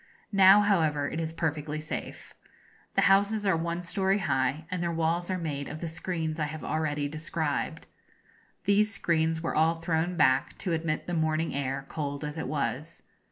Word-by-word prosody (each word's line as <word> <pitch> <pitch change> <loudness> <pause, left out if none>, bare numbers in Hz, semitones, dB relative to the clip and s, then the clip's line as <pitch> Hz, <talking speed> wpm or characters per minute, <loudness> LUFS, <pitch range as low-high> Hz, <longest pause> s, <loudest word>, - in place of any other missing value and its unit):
Now, 195 +1 +8
however, 160 -8 +2
it 160 - -4
is 160 -1 -2
perfectly 155 -2 -2
safe. 155 - -6 0.6
The - - +4
houses 205 +2 +3
are 195 -3 +3
one 170 +1 -2
story 190 +2 +1
high, 140 -4 0
and 180 -1 -2
their 170 -1 0
walls 165 +2 0
are 185 - 0
made 145 -5 -3
of 155 - -6
the 170 - -4
screens 165 -1 -3
I 155 - +1
have 155 +1 -6
already 150 -2 -1
described. 160 +1 -2 0.8
These 205 +2 +3
screens 160 -4 +1
were - - -1
all 165 +1 +2
thrown 165 +1 -1
back, 135 -3 +3
to 180 -5 -2
admit 160 -1 -1
the 175 - -4
morning 160 0 0
air, 135 0 -2
cold 145 -1 -4
as 150 +1 -4
it - - -3
was. 155 +2 -3
160 Hz, 175 wpm, -28 LUFS, 150-175 Hz, 0.8 s, Now